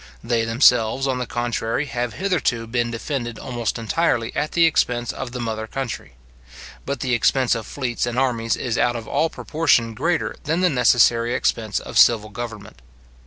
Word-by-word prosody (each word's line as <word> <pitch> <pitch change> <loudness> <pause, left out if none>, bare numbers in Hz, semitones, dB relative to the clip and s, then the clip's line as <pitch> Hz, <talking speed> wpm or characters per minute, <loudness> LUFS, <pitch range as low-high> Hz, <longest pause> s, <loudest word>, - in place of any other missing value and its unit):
They 115 -1 0
themselves, 120 +1 +3
on 130 -2 -1
the 125 - -3
contrary, 120 +2 -2
have 120 -2 -3
hitherto 180 -12 0
been 120 +1 -1
defended 120 0 -4
almost 120 -3 -3
entirely 115 0 0
at 150 +1 -2
the 170 -1 +5
expense 125 -6 +1
of 130 -2 -6
the 125 - -6
mother 110 -2 -3
country; 120 - -5 0.7
but 140 -2 -3
the 125 -1 0
expense 125 +2 +2
of 115 -3 -4
fleets 120 -4 -2
and 120 0 -3
armies 120 -3 0
is 120 -2 -2
out 120 0 +2
of 115 -1 -6
all 165 - +1
proportion 145 -10 +1
greater 165 +9 -1
than 160 +4 0
the 180 -2 +3
necessary 120 -2 +3
expense 110 -2 0
of - - -1
civil 110 -2 +5
government. 110 - -8
120 Hz, 170 wpm, -22 LUFS, 115-135 Hz, 0.7 s, the